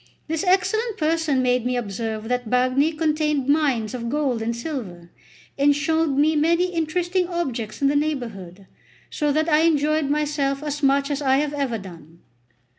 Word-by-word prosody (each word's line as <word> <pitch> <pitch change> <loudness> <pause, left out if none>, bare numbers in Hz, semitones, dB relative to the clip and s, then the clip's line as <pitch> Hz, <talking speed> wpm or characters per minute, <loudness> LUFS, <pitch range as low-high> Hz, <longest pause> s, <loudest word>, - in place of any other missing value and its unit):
This 320 0 -2
excellent 425 +4 +1
person 310 -4 +1
made 250 -1 +2
me 250 0 -1
observe 220 0 -4
that 250 0 -1
the - - -8
Bagni 255 +5 +2
contained 300 -3 0
mines 275 -7 +1
of 235 -2 -4
gold 270 -4 -1
and 230 +1 -2
silver, 220 - -6 0.5
and 285 +1 +4
showed 320 +2 +1
me 310 +2 +3
many 340 +4 +2
interesting 350 +2 0
objects 270 -10 -4
in - - +5
the 285 - +1
neighbourhood; 225 - -3 0.5
so 295 -1 0
that 310 +2 +1
I 305 -2 +4
enjoyed 305 -2 +2
myself 290 -1 -1
as 295 0 -4
much 280 +1 +2
as 285 0 -2
I 265 -1 +3
have 295 +1 -1
ever 275 -5 -1
done. 170 -4 -12
285 Hz, 170 wpm, -23 LUFS, 245-310 Hz, 0.5 s, in